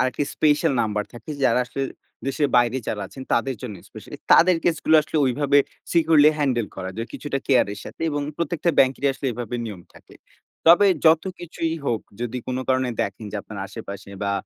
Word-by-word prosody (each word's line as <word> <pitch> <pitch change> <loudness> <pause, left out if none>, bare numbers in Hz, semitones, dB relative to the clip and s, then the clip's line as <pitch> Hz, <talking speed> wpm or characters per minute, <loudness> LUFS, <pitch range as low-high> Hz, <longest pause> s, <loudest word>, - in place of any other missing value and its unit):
আরেকটি 130 +3 0
special 150 0 +2
number 105 -1 -1
থাকে, 120 +6 -10
যারা - - +4
আসলে 135 +2 -5 0.4
দেশের 145 +1 0
বাইরে 120 +1 +3
যারা 105 - -2
আছেন, 130 - -10
তাদের 130 +3 0
জন্য 110 -5 -5
স্পেশালি - - -10 0.2
তাদের 180 0 +6
কেসগুলা 160 -1 +3
আসলে 155 - -5
ঐভাবে 140 +2 +3 0.3
সিকিউরলি 160 -2 +5
হ্যান্ডেল 125 -6 +1
করা 95 -1 -5
যায়, 115 +2 -4
কিছুটা 145 -2 -3
কেয়ার 130 -3 +4
এর 100 - -10
সাথে, - - -11
এবং 145 0 -2 0.2
প্রত্যেকটা 170 0 0
ব্যাংকেরই 135 +1 +3
আসলে 135 - -5
এভাবে 120 +1 -5
নিয়ম 105 -6 -7
থাকে। - - -17 0.5
তবে 175 +5 +7 0.2
যতকিছুই 165 0 +1
হোক 115 -5 0 0.2
যদি 120 +1 -3
কোনো 130 0 -2
কারণে 130 -1 +1
দেখেন, 100 +3 -5
যে - - -2
আপনার - - -9
আশেপাশে, 100 0 -9
বা 100 0 0
135 Hz, 180 wpm, -23 LUFS, 120-155 Hz, 0.5 s, তবে